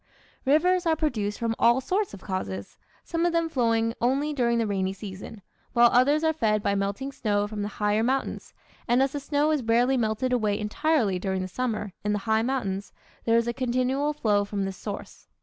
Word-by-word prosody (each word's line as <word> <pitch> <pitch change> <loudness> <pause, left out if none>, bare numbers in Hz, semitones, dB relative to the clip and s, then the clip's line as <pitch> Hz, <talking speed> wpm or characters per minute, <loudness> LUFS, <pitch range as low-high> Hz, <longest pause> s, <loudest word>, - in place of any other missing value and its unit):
Rivers 350 +6 +3
are 320 - +3
produced 220 -10 -1
from 230 -1 -1
all 235 +2 +5
sorts 380 +9 -1
of 190 - -14
causes, 100 - -5 0.2
some 335 -1 -2
of 345 -1 +2
them 335 0 +2
flowing 230 -4 +1
only 275 +5 +1
during 235 -4 +1
the 230 - +1
rainy 190 -2 -1
season, 200 +1 -9 0.3
while 240 -1 +6
others 285 +5 +4
are 320 0 +3
fed 215 -8 +1
by 200 - +1
melting 200 +7 -2
snow 205 -5 0
from 210 0 -5
the 205 - -2
higher 210 0 0
mountains, 260 +4 -2 0.3
and 245 +2 +4
as 270 - 0
the 290 - -3
snow 290 +2 +1
is 300 -3 +1
rarely 240 +3 +2
melted 235 +2 0
away 215 -4 +1
entirely 215 - +1
during 190 0 -2
the - - -4
summer, 215 -2 -3
in 210 0 0
the - - +1
high 220 0 +2
mountains, 205 -6 -2 0.3
there 230 0 +4
is 235 0 +1
a 235 - 0
continual 255 +3 0
flow 215 -9 +1
from 200 -1 -3
this 195 0 -4
source. 200 +1 -8
230 Hz, 200 wpm, -26 LUFS, 205-270 Hz, 0.3 s, while